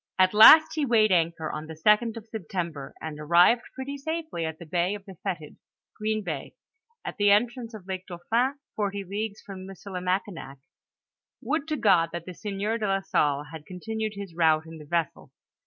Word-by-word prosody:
* - - -64
At 185 +1 +4
last 315 +9 +9
he 310 -2 -1
weighed 225 -5 +3
anchor 165 -3 +1
on 155 +1 -6
the 160 - -8
2d 210 +7 +3
of 220 - -9
September, 170 -9 -5
and 155 -1 -6
ar 150 - -7
rived 180 +9 +5
pretty 275 +2 -5
safely 315 - -3
at 160 0 -6
the 170 - -10
Bay 175 +4 0
of 200 -1 -11
the 195 - -10
Fetid 170 -7 -5 0.4
(Green 215 0 -2
bay), 155 -7 -5 0.5
at - - -5
the 205 -1 +4
entrance 230 +2 +1
of 200 -4 -11
Lake 185 -1 -5
Dauphin, 230 +10 0 0.2
forty 200 -1 -2
leagues 205 +2 -4
from 190 -2 -9
Missili 195 -1 -7
makinak. 180 -6 -3 0.9
Would 310 0 -1
to 310 -1 -1
God 180 -8 +4
that 170 -1 -5
the 185 - -7
sieur 210 +4 -3
de 215 - -1
la 195 0 +1
Salle 145 -6 +1
had 160 -2 -10
con 180 -1 -8
tinued 220 +1 -3
his 200 -3 -7
route 160 -2 +3
in 160 0 -10
the 150 - -11
vessel. 165 0 -2
195 Hz, 200 wpm, -26 LUFS, 170-220 Hz, 0.9 s, last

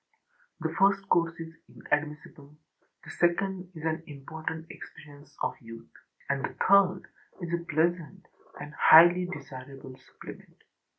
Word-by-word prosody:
The 160 -1 -3
first 195 0 +3
course 165 0 +1
is 165 0 -8 0.2
inadmissible, 150 -1 -5 0.5
the - - -13
second 180 +1 -1
is 155 - -10
an 160 0 -1
important 160 +3 -7
experience 145 -1 -14
of - - 0
youth, 115 0 -12 0.4
and 140 -1 -2
the - - -5
third 190 -2 +4 0.4
is 170 -2 -6
a 170 0 -1
pleasant 170 +3 -1 0.3
and 150 - -9
highly 175 +4 +7
desirable 135 -5 -10
supplement. - - -14
160 Hz, 125 wpm, -28 LUFS, 145-175 Hz, 0.5 s, highly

